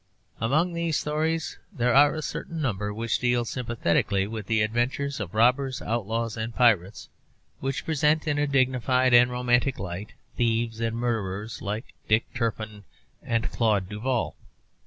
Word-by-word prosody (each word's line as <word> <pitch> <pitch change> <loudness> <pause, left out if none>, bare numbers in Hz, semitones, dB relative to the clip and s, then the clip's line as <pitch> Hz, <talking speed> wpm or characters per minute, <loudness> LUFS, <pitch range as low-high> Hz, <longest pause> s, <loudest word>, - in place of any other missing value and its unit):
Among 155 +10 +1
these 170 -2 0
stories 160 +2 -1
there 120 0 +1
are 145 +3 +6
a 155 - -4
certain 165 +2 -5
number 105 -8 -1
which 115 +2 -1
deal 120 -1 +1
sympathetically 110 -5 0
with 110 -1 -6
the 110 -1 +2
adventures 120 +5 -1
of 100 -1 -5
robbers, 130 +3 +3
outlaws 115 0 -2
and 115 0 -4
pirates, 105 -6 +2 0.5
which 135 0 -3
present 155 0 +2
in 145 -1 +1
a 145 - +1
dignified 130 -1 +2
and 120 +1 +7
romantic 125 +1 +1
light 95 +2 -6 0.2
thieves 115 -1 0
and 115 0 -1
murderers 110 -3 -3
like 105 +2 -4
Dick 110 +2 +1
Turpin 110 -3 -3 0.4
and 115 0 -1
Claude 105 -5 +1
Duval. 120 +4 -2
120 Hz, 145 wpm, -26 LUFS, 110-130 Hz, 0.5 s, and